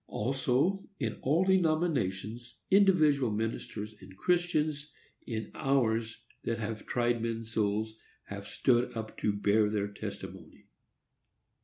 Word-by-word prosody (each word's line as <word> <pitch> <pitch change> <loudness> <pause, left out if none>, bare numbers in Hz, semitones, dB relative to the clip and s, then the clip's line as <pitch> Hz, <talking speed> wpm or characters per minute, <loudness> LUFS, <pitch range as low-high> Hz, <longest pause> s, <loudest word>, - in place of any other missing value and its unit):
Also, 135 - 0
in 115 -5 -2
all 155 +7 +3
denominations, 140 - +1
individual 155 - +5
ministers 105 -1 -4
and 95 0 -13
Christians, 155 - +1 0.4
in 110 -2 -4
hours 115 -4 0 0.2
that 115 - -1
have 110 -1 -4
tried 120 -1 +1
men's 115 -1 -3
souls, 110 0 0 0.3
have 100 0 -8
stood 120 -2 +2
up 110 -1 -5
to 105 - +2
bear 105 +1 +3
their 105 -1 -1
testimony. 100 - -8
115 Hz, 115 wpm, -31 LUFS, 110-145 Hz, 0.4 s, individual